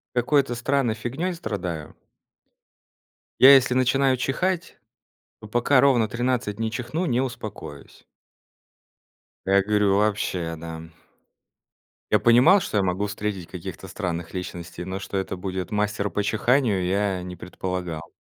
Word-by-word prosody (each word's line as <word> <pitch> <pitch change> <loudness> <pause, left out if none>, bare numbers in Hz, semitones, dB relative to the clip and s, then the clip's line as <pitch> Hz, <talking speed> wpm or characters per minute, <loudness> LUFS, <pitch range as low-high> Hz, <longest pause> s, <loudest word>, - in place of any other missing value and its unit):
какой-то 130 +1 +2
странной 120 -1 0
фигнёй 135 +11 -3
страдаю 90 - -5 1.5
"я 135 +2 +10
если 130 -1 +4
начинаю 130 +1 +3
чихать, 170 +7 -2 0.6
то 110 - -10
пока 120 +4 +3
ровно 125 -5 +4
13 115 -2 -1
не 110 -1 -1
чихну, 125 +10 -3
не 125 0 +1
успокоюсь". 75 - -8 1.4
А - - -1
я 100 0 +5
горю: 105 -1 +2
"Вообще, 95 -5 -1
да, 80 0 -7
м". 80 0 -11 1.2
Я - - +5
понимал, 125 +12 +6
что 105 - -3
я 100 - +3
могу 95 +2 0
встретить 100 -3 -4
каких-то 95 +1 -8
странных 85 -2 -4
личностей, 90 -1 -6
но 95 +1 -4
что 100 0 -6
это 95 0 -2
будет 95 -1 -4
мастер 105 -1 -1
по 105 - -1
чиханию- 110 -1 +1
я 95 -1 0
не 90 0 -7
предполагал. 90 -3 -5
105 Hz, 135 wpm, -24 LUFS, 90-125 Hz, 1.5 s, я